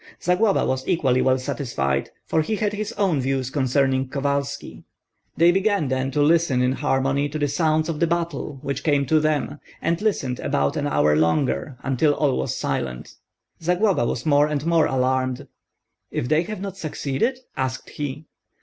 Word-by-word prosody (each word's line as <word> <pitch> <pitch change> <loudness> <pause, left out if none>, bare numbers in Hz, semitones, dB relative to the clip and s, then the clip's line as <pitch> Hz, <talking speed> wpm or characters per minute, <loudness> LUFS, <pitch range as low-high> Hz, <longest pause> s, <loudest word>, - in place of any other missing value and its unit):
Zagloba 190 +4 +2
was 130 0 -2
equally 130 -6 +2
well 130 0 +3
satisfied, 115 - -2 0.2
for 160 - +1
he 215 +8 -1
had 210 -1 -1
his 210 +1 -3
own 185 - +1
views 130 0 -1
concerning 135 -1 +1
Kovalski. 140 +1 -3 0.5
They 170 +2 +6
began 195 -5 +1
then 130 0 0
to 145 +2 +1
listen 160 -4 +3
in 125 - +2
harmony 135 +2 0
to 150 - -4
the 145 -1 +1
sounds 155 +2 +1
of 160 -3 -3
the 170 - +3
battle 165 -4 -2
which 140 -1 -3
came 145 -3 +2
to 155 +4 +3
them, 150 -1 -1 0.2
and 170 +3 -1
listened 140 - -1
about 70 0 0
an - - -1
hour 75 +1 +3
longer, 125 - +1
until 135 +3 +2
all 140 -4 +1
was - - -2
silent. 60 -2 -3 0.5
Zagloba 180 - +2
was 120 - -3
more 145 -1 +4
and 150 -1 -2
more 165 -2 +3
alarmed. 130 -1 0 0.6
"If 125 - -2
they 155 +3 +3
have 210 -1 -6
not 195 -1 -5
succeeded?" 160 - -1 0.2
asked 130 0 -3
he. 145 +1 -5
145 Hz, 170 wpm, -23 LUFS, 130-165 Hz, 0.6 s, They